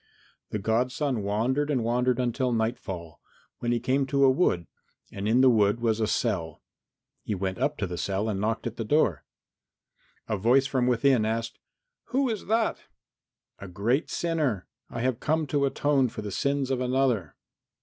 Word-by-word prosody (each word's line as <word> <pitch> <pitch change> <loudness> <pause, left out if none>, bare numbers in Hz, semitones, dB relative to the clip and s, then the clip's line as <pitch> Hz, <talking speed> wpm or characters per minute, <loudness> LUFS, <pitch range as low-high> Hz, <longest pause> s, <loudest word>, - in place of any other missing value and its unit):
IX - - -34
The - - +1
godson 125 +4 0
wandered 120 +9 0
and 130 -6 +1
wandered 125 +1 +1
until 125 +1 0
nightfall, 110 -8 -3 0.4
when 120 - -1
he 120 - +1
came 135 +3 0
to 140 0 +2
a 135 - +7
wood, 130 - +1 0.5
and 100 +1 -4
in 120 +4 +4
the 130 - +7
wood 105 -1 +3
was 115 -2 +1
a 110 - +1
cell. 85 -10 -2 0.6
He 105 - -3
went 95 0 -3
up 150 +1 0
to 105 - -1
the 90 -2 -5
cell 100 +2 -1
and 100 -3 -2
knocked 110 +2 -1
at 120 -1 -4
the 115 - -2
door. 105 - +1 1.0
A 110 - -1
voice 125 +7 +4
from 130 -2 0
within 125 -1 +3
asked, 115 +1 -2 0.5
"Who 265 0 0
is 215 - -5
that?" 225 +1 +1 0.8
"A 100 - -8
great 110 - 0
sinner. 150 - -1 0.2
I 115 - -5
have 125 -2 0
come 155 +1 0
to 140 0 +1
atone 135 -2 +1
for 110 - -7
the 105 - -5
sins 140 +4 0
of 130 -1 0
another." 125 - 0
120 Hz, 180 wpm, -27 LUFS, 105-135 Hz, 1.0 s, a